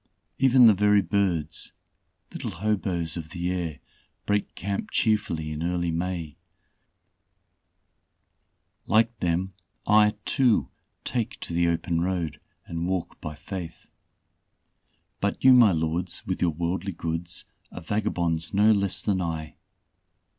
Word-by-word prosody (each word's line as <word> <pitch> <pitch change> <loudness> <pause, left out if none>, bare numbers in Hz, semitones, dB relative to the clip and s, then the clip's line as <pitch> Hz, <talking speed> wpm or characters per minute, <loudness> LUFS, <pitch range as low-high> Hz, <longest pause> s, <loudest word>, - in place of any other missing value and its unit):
Even 130 -1 +6
the 110 - +8
very 105 0 +4
birds 90 -5 0 0.6
little - - -4
hoboes 90 -4 -1
of 80 -2 -6
the 90 +1 -3
air, 85 -5 -3 0.5
break 105 0 -1
camp 100 +1 -3
cheerfully 100 -8 0
in 75 0 -4
early 85 0 0
May. 85 -2 -3 2.5
Like 115 +2 +3
them 90 +2 -1 0.3
I, 105 0 +5
too, 125 -5 +2 0.3
take 120 -4 -2
to - - -5
the 85 0 +2
open 85 0 0
road 85 -4 -2 0.3
and 85 +1 -3
walk 95 -2 -3
by 75 -1 -6
faith. 90 +2 -7 1.3
"But 100 - -2
you, 130 0 +8
my 120 -5 +7
lords, 85 +2 -2
with 95 - -3
your 90 - +3
worldly 85 +4 -2
goods, 85 +1 -3 0.3
are - - -8
vagabonds 85 -4 -1
no 105 +2 +5
less 100 -3 +1
than 95 -3 +1
I. 80 -3 -4
90 Hz, 125 wpm, -26 LUFS, 85-105 Hz, 2.5 s, the